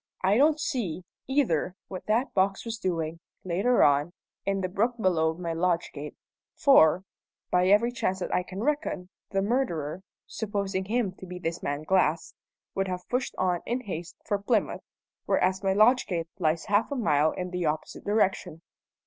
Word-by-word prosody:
I 190 +2 +4
don't 300 +5 +4
see, 235 - -2 0.2
either, 225 - +1
what 185 -2 -8
that 230 +5 +1
box 195 +2 +1
was 225 -1 -4
doing, 165 -4 -2 0.2
later 195 +8 +2
on, 145 +4 +3 0.3
in 195 0 +1
the 185 - 0
brook 215 +6 0
below 160 -5 +2
my 170 -1 -3
lodge 170 0 0
gate; 150 0 -7 0.4
for, 185 - +5 0.5
by 180 0 +3
every 210 +5 +4
chance 190 -6 -1
that 185 - -4
I - - +3
can 185 +3 -6
reckon, 285 - -1 0.2
the 195 -1 0
murderer 190 - -1 0.2
supposing 200 -3 -3
him 220 -1 0
to 190 - -9
be 180 0 -7
this 170 -1 -3
man 145 +1 -3
Glass 170 -2 +1 0.4
would 195 0 -1
have 180 -1 -5
pushed 250 +1 -1
on 180 -2 +1
in 245 +2 -1
haste 175 -6 -6
for 205 -2 0
Plymouth, 210 +1 0 0.5
whereas 185 +1 +2
my 195 -1 +1
lodge 230 +6 +4
gate 165 -3 -2
lies 160 -1 +1
half 205 +5 +2
a - - -1
mile 155 - +3
in 180 -1 -4
the 180 -2 -1
opposite 155 +1 -3
direction." 190 -6 0
190 Hz, 175 wpm, -27 LUFS, 170-220 Hz, 0.5 s, for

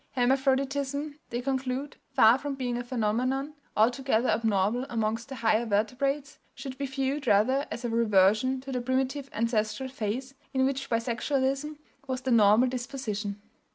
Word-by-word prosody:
"Hermaphroditism," 275 +3 0
they 240 +1 -3
conclude, 265 +1 -2
"far 255 -2 +5
from 280 0 -4
being 250 -2 -2
a 245 - -3
phenomenon 255 +4 -1 0.2
altogether 245 +2 +2
abnormal 220 +2 +1
amongst 225 +1 -2
the 270 - -6
higher 225 -1 +2
vertebrates, 275 +8 -1 0.2
should 265 0 -7
be 280 - -1
viewed 270 +1 -2
rather 245 +7 +3
as 240 - -5
a - - 0
reversion 225 +3 +3
to 270 +1 -7
the 250 -1 -1
primitive 265 +2 -1
ancestral 230 +3 -1
phase 255 +2 -4 0.2
in 260 0 +3
which 270 0 -2
bisexualism 265 +5 -1 0.3
was 260 -1 -2
the 260 0 -2
normal 220 +2 +6
disposition.... 240 -5 -4
255 Hz, 145 wpm, -28 LUFS, 230-270 Hz, 0.3 s, normal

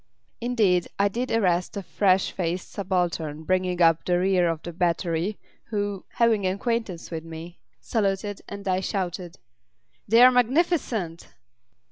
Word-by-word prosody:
Indeed, 215 -7 +2
I 200 0 +3
did 245 +5 -3
arrest 185 -3 +1
a 200 - -4
fresh 185 +1 +2
faced 175 0 -3
subaltern 175 -5 -2
bringing 180 0 +1
up 165 -1 +4
the 175 -1 +1
rear 180 -1 +2
of 165 -1 -3
the 175 - -6
battery 175 +2 0 0.3
who, 205 -3 -3
having 225 -5 +2
acquaintance 200 -2 -2
with 160 -1 -4
me, 165 +2 -9 0.2
saluted, 205 -2 -1
and 200 0 -7
I 185 0 +2
shouted: 180 -2 -3 0.7
"They're 235 +4 +7
magnificent!" 250 - +1
185 Hz, 130 wpm, -25 LUFS, 175-210 Hz, 0.7 s, They're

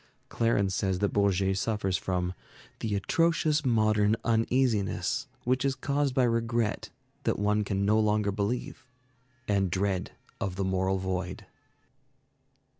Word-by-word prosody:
Clarens 105 -4 +1
says 95 0 0
that 100 +2 0
Bourget 95 -1 +2
suffers 105 -4 -1
from 90 -1 -1 0.5
"the 110 -2 -2
atrocious 155 +6 +1
modern 110 -4 +3
uneasiness 115 0 +1 0.2
which 130 +2 +1
is 135 -1 +1
caused 140 -1 -1
by 130 - +4
regret 115 -2 0 0.3
that - - 0
one 105 +1 +1
can 100 0 -1
no 105 +2 +3
longer 105 -1 +2
believe, 115 +6 -3 0.6
and 100 -2 +1
dread 95 +1 -1 0.3
of 95 -2 -3
the 95 0 -1
moral 95 0 +1
void." 95 -1 -3
105 Hz, 125 wpm, -28 LUFS, 95-115 Hz, 0.6 s, by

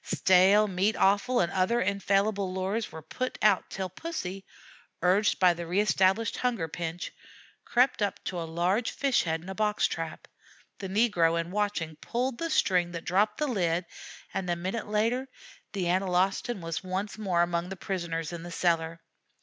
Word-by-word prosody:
Stale 190 +3 +4
meat 195 +3 +1
offal 205 +6 +3
and 175 +1 0
other 190 +6 +1
infallible 200 -1 +1
lures 190 +4 -2
were 160 - -9
put 255 - -4
out 210 -3 +3
till 190 -1 -3
Pussy, 195 - -5 0.6
urged 195 +4 +3
by 180 -2 +6
the 170 0 -6
reestablished 195 +3 +2
hunger 235 -10 -1
pinch, 170 +1 -5 0.5
crept 250 -1 +2
up 205 -2 0
to 180 -2 -3
a 165 - -5
large 180 +8 +1
fish 275 -3 +1
head 160 0 -2
in - - -12
a - - -3
box 210 +1 +1
trap; 165 -1 -4 0.5
the 195 - -4
negro, 185 -6 +2
in 170 +1 -4
watching, 200 -6 -2
pulled 245 +8 -2
the 330 - -2
string 180 - +2
that 165 -1 -6
dropped 205 +4 +2
the 300 - 0
lid, 175 -7 0 0.5
and, 185 -2 -3
a 175 - +2
minute 190 +6 -4
later, 230 +5 0 0.5
the 195 -3 -2
Analostan 190 +4 +1
was 165 +2 -4
once 190 +3 -4
more 180 -5 +2
among 175 0 -1
the 195 - -5
prisoners 170 -4 -3
in 170 - -6
the 175 - -8
cellar. 165 -1 0
190 Hz, 170 wpm, -28 LUFS, 175-210 Hz, 0.6 s, by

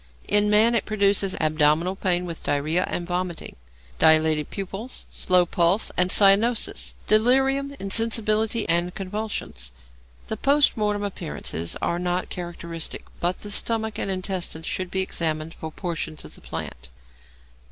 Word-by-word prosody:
In 205 0 +3
man 215 +3 +4
it 235 - 0
produces 200 -2 +2
abdominal 155 +3 +2
pain 180 -2 0
with 170 -2 -7
diarrhoea 155 +5 0
and 175 - -3
vomiting; 180 -1 -4 0.4
dilated 155 -1 +4
pupils, 200 +5 -6
slow 180 -1 +2
pulse, 175 +4 +2
and 180 0 +2
cyanosis; 210 +5 +4
delirium, 270 +5 +3
insensibility, 220 +1 +2
and 175 +1 0
convulsions. 195 - -5 0.5
The 220 - -5
post 285 +5 +3
mortem 210 -1 -1
appearances 160 - -3
are 170 - 0
not 180 +1 -2
characteristic, 170 -2 -6
but 175 +1 0
the 205 - -5
stomach 220 0 -1
and - - -2
intestines 185 -4 -3
should 185 -1 -3
be 190 +1 0
examined 160 -3 -2
for 160 - -8
portions 160 -3 -5
of - - -9
the - - -11
plant. - - -7
185 Hz, 135 wpm, -24 LUFS, 170-215 Hz, 0.5 s, man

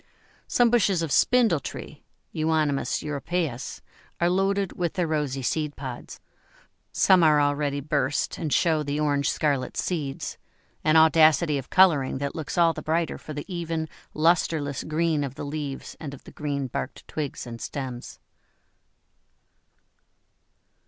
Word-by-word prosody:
Some 240 -2 +3
bushes 195 -7 +3
of 160 - -3
Spindle 230 - +4
tree - - -8 0.3
(Euonymus 155 -3 0
europæus) 150 -2 -3 0.4
are 175 +1 +2
loaded 195 +1 +1
with 175 -2 -2
their 180 -3 0
rosy 145 -4 -2
seed 150 +2 -1
pods; 130 -3 -7 0.7
some 185 -2 +5
are 155 -2 +5
already 145 0 0
burst, 145 -1 -1
and 155 -4 -3
show 160 0 +3
the 145 0 -2
orange 145 -1 +1
scarlet 140 -4 -1
seeds 145 -7 -3 0.4
an 155 +1 +3
audacity 160 -1 +5
of 130 - -10
colouring 160 -9 +4
that 140 +1 -3
looks 155 0 -5
all 170 -1 +5
the - - -6
brighter 165 +1 -1
for 155 - -8
the 145 0 -5
even, 165 -3 -3 0.3
lustreless 155 -3 +1
green 155 -1 0
of 135 -1 -5
the 145 - -6
leaves 145 -2 -5
and 140 -3 -6
of - - -17
the - - -12
green 145 -2 -3
barked 130 +1 -5
twigs 150 -4 -4
and 115 -1 -8
stems. 130 -4 -6
150 Hz, 140 wpm, -25 LUFS, 140-165 Hz, 0.7 s, some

